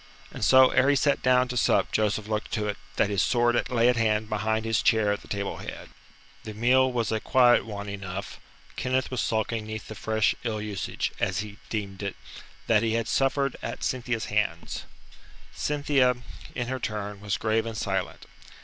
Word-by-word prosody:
And - - -6
so 130 0 +7
ere 130 +2 +4
he 145 - +4
sat 140 +1 +2
down 125 0 +4
to 125 - -4
sup 125 - +2
Joseph 105 0 0
looked 110 0 -3
to 105 - 0
it 105 - -3 0.2
that 105 - +2
his 100 -2 +2
sword 120 +1 +2
lay 120 -2 +3
at 125 -1 +3
hand 110 -1 +1
behind 110 +1 0
his 115 0 +1
chair 110 -3 +3
at 105 - -5
the - - -15
table 100 -1 -3
head. - - -8 0.5
The 110 -1 -7
meal 130 +4 +4
was 115 -3 -1
a 110 - 0
quiet 120 0 +4
one 105 -1 -6
enough. 100 -1 -6 0.4
Kenneth 130 0 -1
was 125 -3 -1
sulking 110 -1 -1
'neath 110 0 -6
the - - -5
fresh 110 0 +1
ill 110 -3 -2
usage 105 -2 -3
as - - 0
he 105 -1 -9
deemed 100 -3 -4
it 100 -1 -3 0.5
that 110 -2 +4
he 115 -1 0
had 115 0 0
suffered 135 +1 +1
at - - -5
Cynthia's 125 -3 -1
hands. 100 -5 -2 0.7
Cynthia, 140 - +2 0.4
in 125 - -1
her 130 +1 -3
turn, 105 -3 -4
was 105 0 -1
grave 110 +1 0
and 115 -1 -5
silent. 95 -3 -3
110 Hz, 190 wpm, -27 LUFS, 105-125 Hz, 0.7 s, so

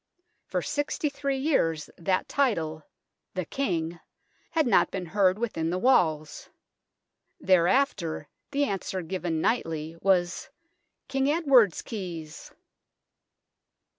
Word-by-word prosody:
For - - -2
sixty 295 +2 -1
three 280 -1 -2
years 165 - 0
that 185 +1 0
title 165 - 0 0.5
"The 185 -2 -2
King" 170 - -2 0.5
had 320 -2 +1
not 235 - +4
been 185 -2 -4
heard 185 +2 +2
within 185 -8 -2
the 180 - -1
walls. 160 - +1 0.9
Thereafter 180 - +2 0.2
the 285 0 +1
answer 195 -6 -2
given 170 -2 -2
nightly 165 -8 -1
was 185 -2 +1 0.3
" - - -52
King 270 +1 +1
Edward's 275 - +4
keys." 170 -8 -7
185 Hz, 105 wpm, -27 LUFS, 165-265 Hz, 0.9 s, not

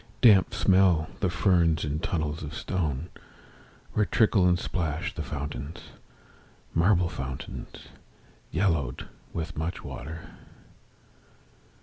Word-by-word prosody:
Damp 105 -6 +7
smell 95 -4 +4
the 95 - +1
ferns 85 -3 +3
in 75 +1 -2
tunnels 80 -2 -2
of 75 +1 -6
stone, 80 -4 -2 0.8
Where 105 - +3
trickle 100 -1 +4
and 90 - +3
plash 80 -3 -2
the - - -5
fountains, 70 0 -6 0.8
Marble 90 +1 +4
fountains, 65 -4 -7 0.6
yellowed 80 -9 0 0.2
with 80 -1 -4
much 80 +3 -3
water. 80 +6 -7
85 Hz, 100 wpm, -27 LUFS, 75-90 Hz, 0.8 s, Damp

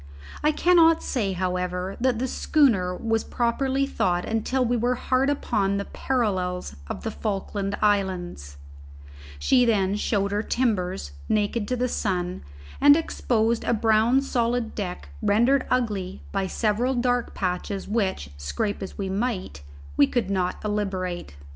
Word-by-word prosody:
I 300 - +4
cannot 330 0 +4
say, 205 -7 -1
however, 180 +1 -2
that 255 -2 +2
the 260 +3 -1
schooner 225 - +2
was 225 -1 0
properly 265 +3 0
thawed 180 -9 0
until 250 +4 0
we 245 +1 +1
were 240 +2 +1
hard 260 +2 +1
upon 200 -8 0
the 200 - -3
parallels 185 - -1
of - - -6
the 225 - -2
Falkland 200 -1 -3
Islands; 180 - 0 0.8
she 250 - +4
then 200 -4 +2
showed 200 -1 0
her 205 +1 0
timbers 190 - -1 0.2
naked 210 +1 0
to 255 - 0
the 250 +1 0
sun, 180 -6 -2 0.4
and 290 +1 +8
exposed 235 -7 0
a 235 - +1
brown 225 +4 +3
solid 240 -3 0
deck 180 - -5
rendered 240 +6 +3
ugly 205 -7 -1
by 195 -1 -1
several 230 +6 0
dark 245 0 0
patches 190 +1 -2
which, 190 - -1
scrape 205 - -2
as 190 - -7
we 195 - -2
might, 190 - -2 0.4
we 140 - +6
could 220 -6 -1
not 185 -2 0
obliterate. 190 - -3
210 Hz, 140 wpm, -25 LUFS, 190-245 Hz, 0.8 s, and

